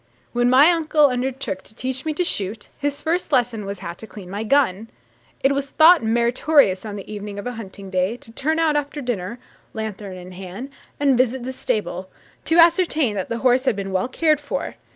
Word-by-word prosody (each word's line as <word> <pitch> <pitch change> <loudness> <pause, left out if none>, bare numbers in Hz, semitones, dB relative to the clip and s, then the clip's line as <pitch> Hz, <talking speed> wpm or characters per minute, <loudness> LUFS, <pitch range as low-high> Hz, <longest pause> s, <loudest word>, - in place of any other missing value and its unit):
When 245 0 +2
my 275 +7 +7
uncle 310 -3 +3
undertook 250 -5 -3
to 215 - -16
teach 260 +2 -4
me 310 - -1
to 360 - +1
shoot, 210 - -3
his 285 0 -2
first 330 0 -1
lesson 240 -5 +1
was 200 0 -4
how 170 - -4
to 220 +5 -11
clean 190 -5 -11
my 205 +2 -3
own 220 - -5
gun. 225 -5 +2 0.5
It 270 - +4
was 280 0 -2
thought 330 +4 +6
meritorious 235 -2 +2
on 205 - -6
the 205 +1 -8
evening 205 -1 -6
of 205 - -6
a 245 - -2
hunting 200 -4 -9
day, 185 +5 0
to 225 - -15
turn 310 +7 -1
out 320 -2 +2
after 290 0 -2
dinner, 235 -4 -3 0.4
lanthorn 205 -3 -5
in 180 0 -10
hand, 190 +8 -8 0.3
and 275 -3 +3
visit 255 0 +1
the 260 +1 -4
stable, 210 -8 -3 0.4
to 325 - +2
ascertain 335 - +4
that 190 -3 -4
the 230 - -2
horse 255 +1 +4
had 245 - +2
been 195 -1 -4
well 185 +4 0
cared 305 +2 +2
for. 285 -1 -4
245 Hz, 210 wpm, -22 LUFS, 205-285 Hz, 0.5 s, my